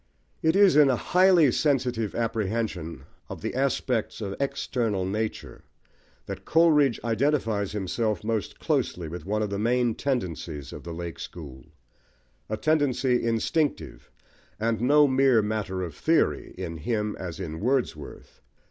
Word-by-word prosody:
It 160 Hz, +2 st, +2 dB
is 200 Hz, -5 st, +6 dB
in 150 Hz, -2 st, +6 dB
a 130 Hz, -, +3 dB
highly 180 Hz, -1 st, +4 dB
sensitive 125 Hz, -7 st, 0 dB
apprehension 110 Hz, -, -2 dB, 0.3 s
of -, -, -8 dB
the -, -, -2 dB
aspects 130 Hz, -3 st, -1 dB
of 100 Hz, -3 st, -4 dB
external 115 Hz, -7 st, -1 dB
nature 110 Hz, +3 st, -4 dB, 0.6 s
that -, -, -7 dB
Coleridge 150 Hz, -6 st, +4 dB
identifies 115 Hz, -4 st, 0 dB
himself 105 Hz, +1 st, -1 dB
most 110 Hz, -2 st, -3 dB
closely 85 Hz, -2 st, -1 dB
with 90 Hz, +4 st, -8 dB
one 105 Hz, +1 st, 0 dB
of 105 Hz, -, -3 dB
the 100 Hz, -, -2 dB
main 120 Hz, +1 st, +2 dB
tendencies 85 Hz, -, -3 dB
of -, -, -8 dB
the 85 Hz, -, -7 dB
"Lake 85 Hz, -1 st, -6 dB
School"; 65 Hz, -7 st, -9 dB, 0.8 s
a 110 Hz, -, -2 dB
tendency 135 Hz, -2 st, +1 dB
instinctive, 115 Hz, +7 st, -1 dB, 0.5 s
and 115 Hz, 0 st, 0 dB
no 145 Hz, +4 st, +5 dB
mere 130 Hz, -4 st, +4 dB
matter 105 Hz, -3 st, -2 dB
of 85 Hz, -4 st, -5 dB
theory, -, -, 0 dB
in 85 Hz, -3 st, -5 dB
him 105 Hz, +5 st, -2 dB
as 90 Hz, -2 st, -6 dB
in 80 Hz, -4 st, -5 dB
Wordsworth. 120 Hz, -, -3 dB
110 Hz, 140 wpm, -26 LUFS, 95-135 Hz, 0.8 s, is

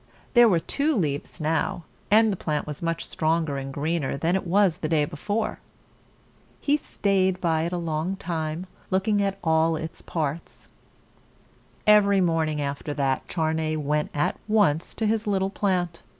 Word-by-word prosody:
There 240 Hz, -2 st, +7 dB
were 180 Hz, -, +3 dB
two 285 Hz, -, 0 dB
leaves 150 Hz, -, -2 dB
now, 160 Hz, +2 st, -1 dB, 0.3 s
and 220 Hz, +1 st, +5 dB
the -, -, -2 dB
plant 150 Hz, -4 st, -2 dB
was 150 Hz, -2 st, -7 dB
much 165 Hz, 0 st, -2 dB
stronger 160 Hz, -2 st, 0 dB
and 135 Hz, 0 st, -6 dB
greener 150 Hz, 0 st, -1 dB
than 165 Hz, +5 st, +1 dB
it 190 Hz, -, -2 dB
was 190 Hz, -2 st, +3 dB
the 155 Hz, -, -3 dB
day 155 Hz, -2 st, +3 dB
before. 205 Hz, +8 st, -3 dB, 1.0 s
He 290 Hz, -, +2 dB
staid 190 Hz, -8 st, 0 dB
by 165 Hz, -2 st, +1 dB
it 170 Hz, -, -2 dB
a 180 Hz, -, -1 dB
long 165 Hz, +2 st, -2 dB
time, 165 Hz, -1 st, -3 dB, 0.2 s
looking 200 Hz, +2 st, +1 dB
at 195 Hz, -1 st, 0 dB
all 160 Hz, 0 st, +3 dB
its 160 Hz, +1 st, -6 dB
parts. 155 Hz, 0 st, -4 dB, 1.2 s
Every 205 Hz, -2 st, +5 dB
morning 165 Hz, -4 st, +1 dB
after 145 Hz, +1 st, -3 dB
that, 135 Hz, -2 st, 0 dB
Charney 160 Hz, -1 st, -1 dB
went 150 Hz, 0 st, -1 dB
at 150 Hz, -, 0 dB
once 195 Hz, -7 st, +2 dB
to 225 Hz, -, -1 dB
his 220 Hz, 0 st, 0 dB
little 195 Hz, -1 st, +1 dB
plant. 180 Hz, -4 st, -1 dB
165 Hz, 160 wpm, -25 LUFS, 155-195 Hz, 1.2 s, There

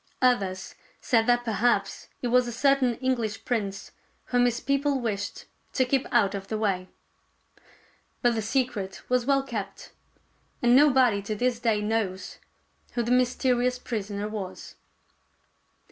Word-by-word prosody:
Others 195 Hz, -7 st, +1 dB, 0.3 s
said 225 Hz, -2 st, +2 dB
that 245 Hz, 0 st, +3 dB
perhaps 230 Hz, +2 st, 0 dB
he -, -, -7 dB
was 250 Hz, +1 st, +3 dB
a -, -, -3 dB
certain 260 Hz, 0 st, +2 dB
English 225 Hz, -4 st, -2 dB
prince 200 Hz, -5 st, -3 dB, 0.3 s
whom 245 Hz, 0 st, +2 dB
his 240 Hz, -1 st, +1 dB
people 275 Hz, 0 st, 0 dB
wished 205 Hz, -4 st, -4 dB, 0.3 s
to 260 Hz, -, +2 dB
keep 265 Hz, +1 st, 0 dB
out 220 Hz, -6 st, +3 dB
of 195 Hz, -1 st, -5 dB
the 220 Hz, -, -2 dB
way. 195 Hz, -4 st, -1 dB, 1.4 s
But 240 Hz, -1 st, +4 dB
the 225 Hz, -, -1 dB
secret 215 Hz, -5 st, -2 dB
was 250 Hz, 0 st, +1 dB
well 275 Hz, -1 st, +3 dB
kept, 205 Hz, -7 st, -6 dB, 0.7 s
and 240 Hz, 0 st, +4 dB
nobody 260 Hz, -7 st, +5 dB
to 215 Hz, +2 st, -4 dB
this 245 Hz, +2 st, 0 dB
day 225 Hz, -3 st, +1 dB
knows 205 Hz, -3 st, -2 dB, 0.5 s
who 240 Hz, -, 0 dB
the 235 Hz, -, -2 dB
mysterious 250 Hz, 0 st, +2 dB
prisoner 205 Hz, -4 st, -4 dB
was. 205 Hz, -4 st, -7 dB
240 Hz, 140 wpm, -26 LUFS, 210-250 Hz, 1.4 s, nobody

